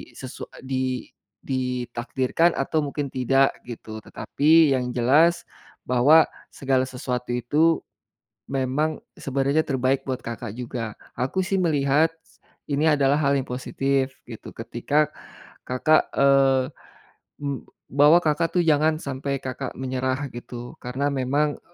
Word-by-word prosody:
sesu 130 -1 -8 0.2
di 130 -2 -2 0.4
ditakdirkan 125 +4 0
atau 150 +3 0
mungkin 145 0 -3
tidak 135 +1 +2
gitu, 110 -2 -9
tetapi 155 -1 +3
yang 125 -1 -2
jelas 150 +8 +3 0.4
bahwa 140 +6 +6 0.2
segala 130 -1 +1
sesuatu 125 -1 -4
itu 150 +7 +2 0.7
memang 135 +4 -1 0.2
sebenarnya 140 +3 0
terbaik 135 0 0
buat 130 -2 -3
Kakak 115 -2 -6
juga. 115 -3 -5 0.2
Aku 130 +9 -1
sih 190 +2 -1
melihat, 150 -1 +2 0.6
ini 145 +2 +1
adalah 140 -1 +3
hal 140 -1 +3
yang 135 - -2
positif 135 +1 -1 0.2
gitu, 110 - -9
ketika 145 +6 0 0.6
Kakak 155 +5 +2
eee, 135 -1 +4 0.8
eb 140 -2 -3 0.3
bahwa 145 +5 +6
Kakak 165 +3 0
tuh 175 - +4
jangan 155 0 +3
sampai 140 0 -3
Kakak 130 0 -5
menyerah 130 +1 -2
gitu, 120 0 -8
karena 130 +4 -1
memang, 140 +3 0
135 Hz, 120 wpm, -24 LUFS, 125-145 Hz, 0.8 s, bahwa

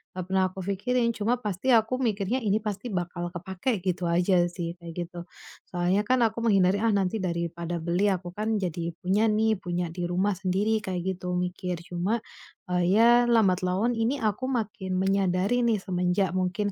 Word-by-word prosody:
enggak 185 -1 -4
pernah 190 0 +3
aku 190 - -10
fikirin. 235 +6 0
Cuma 220 +3 +1
pasti 210 +2 -3
aku 225 +3 +2
mikirnya, 220 0 0
"Ini 210 +1 +2
pasti 210 +2 -4
bakal 175 -1 -3
kepakai." 190 +6 -2
Gitu 185 -1 -1
aja 175 +1 +3
sih, 170 -2 -4
kayak 170 -1 -9 0.2
gitu. 175 - -9 0.5
Soalnya 180 +3 +1
kan 255 0 +3
aku 225 +1 0
menghindari, 195 -2 +3
"Ah, - - +3
nanti 195 +2 0
daripada 170 0 -3
beli, 175 +4 +1
aku 180 -1 -3
kan 215 +1 -1
jadi 170 -2 -3
punya 200 +5 +2
nih. 220 +1 +2
Punya 175 0 -2
di 175 +1 -5
rumah 185 +4 +1
sendiri." 205 +3 +1
Kayak 185 -2 -3 0.2
gitu 180 -1 -3
mikir. 180 0 -2
Cuma, 180 +7 -1 0.5
eee, 180 0 +2 0.2
ya 230 - +7 0.2
lambat 210 -6 +4
laun 190 +6 +1
ini 230 +5 +1
aku 220 +5 0
makin 210 -6 -2
menyadari 195 +3 +1
nih. 220 -3 +2
Semenjak 180 0 0
mungkin, 185 +3 -1
190 Hz, 175 wpm, -27 LUFS, 180-215 Hz, 0.5 s, ya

